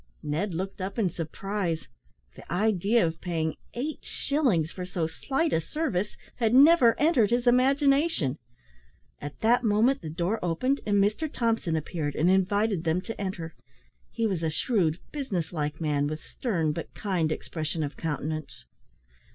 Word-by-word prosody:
Ned 165 +5 -2
looked 190 +2 -4
up 190 +4 -4
in 200 -6 +1
surprise. 175 +1 -3 0.5
The - - -13
idea 205 +2 +2
of 160 -1 -3
paying 160 -3 -2 0.2
eight 290 +6 -4
shillings 240 - 0
for 185 - -6
so 180 -2 -2
slight 270 - -1
a 160 - +2
service 210 - -2 0.2
had 230 -1 +2
never 275 -4 +7
entered 285 - +4
his 240 +1 +1
imagination. 270 - +3 0.8
At 145 0 -7
that 240 +3 +4
moment 230 +5 +3
the 160 - -6
door 175 +7 -1
opened, 255 - 0
and 205 -1 +3
Mr 210 +10 +1
Thompson 225 -8 0
appeared, 155 -2 -3
and 170 +4 +3
invited 195 0 +2
them 165 +1 +1
to 225 +1 -6
enter. 175 -4 -4 0.6
He 230 - -2
was 190 -6 0
a 160 - 0
shrewd, 165 -1 +1
business 195 - -3
like 150 -1 -2
man, 145 -3 +1
with 155 +1 -4
stern, 170 -11 -1
but 165 +2 -6
kind 180 -7 0
expression 155 0 -3
of 145 0 -4
countenance. 155 - -4
190 Hz, 155 wpm, -27 LUFS, 160-235 Hz, 0.8 s, never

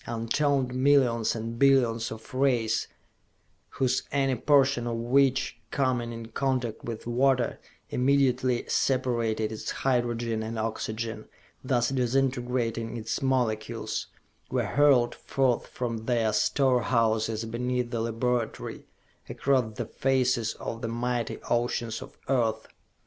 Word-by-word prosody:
Untold 125 +3 0
millions 130 -4 +3
and 115 +1 -5
billions 120 -5 +3
of 110 +2 -10
rays, 125 -4 +1 0.8
whose 130 -1 0
any 135 -1 +1
portion 135 -1 +3
of 120 - -1
which, 130 +3 +2
coming 125 -4 0
in 115 -1 -7
contact 125 -2 -1
with 115 -2 -6
water, 125 +1 +1 0.3
immediately 130 -2 +2
separated 115 -4 0
its 110 - -5
hydrogen 120 -3 0
and 110 +1 -4
oxygen, 110 0 -3 0.4
thus 125 -2 +1
disintegrating 125 -3 0
its 110 +6 -3
molecules, 120 -5 -1 0.4
were - - 0
hurled 140 -5 +4
forth 130 -3 0
from 115 -3 -4
their 115 -3 +2
store 125 +4 +2
houses 110 -1 +1
beneath 125 +1 -2
the 115 -2 -1
laboratory, 115 +1 -2 0.4
across 130 -6 0
the - - -2
faces 130 -4 +1
of 115 - -6
the 115 - -2
mighty 120 +1 -2
oceans 120 -1 -1
of - - -11
Earth.... 115 -4 0
120 Hz, 115 wpm, -27 LUFS, 115-130 Hz, 0.8 s, hurled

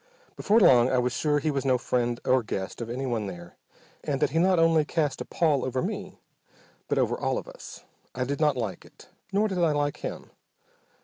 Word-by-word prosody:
Before 220 +2 +3
long 125 - +6
I 130 - +1
was 125 0 0
sure 150 +3 +1
he 150 +2 0
was 140 -2 -2
no 130 -2 +2
friend 120 -1 -1
or 130 0 +3
guest 100 -1 -5
of 115 - -5
anyone 120 -4 -2
there, 85 -2 -9 0.5
and 140 -3 -2
that - - +1
he 165 - +1
not 185 +1 +3
only 165 -1 +4
cast 150 -2 -1
a - - -4
pall 155 -6 +1
over 130 0 -2
me 195 0 -5 0.7
but - - -1
over - - +1
all - - 0
of - - -6
us. - - -11 0.3
I 130 - -1
did 140 +3 -3
not 150 -3 +3
like 105 -7 -4
it, - - -18 0.2
nor 205 +2 +2
did 190 -3 -3
I 165 -3 +3
like 145 -1 -1
him. - - -7
140 Hz, 210 wpm, -26 LUFS, 125-165 Hz, 0.7 s, long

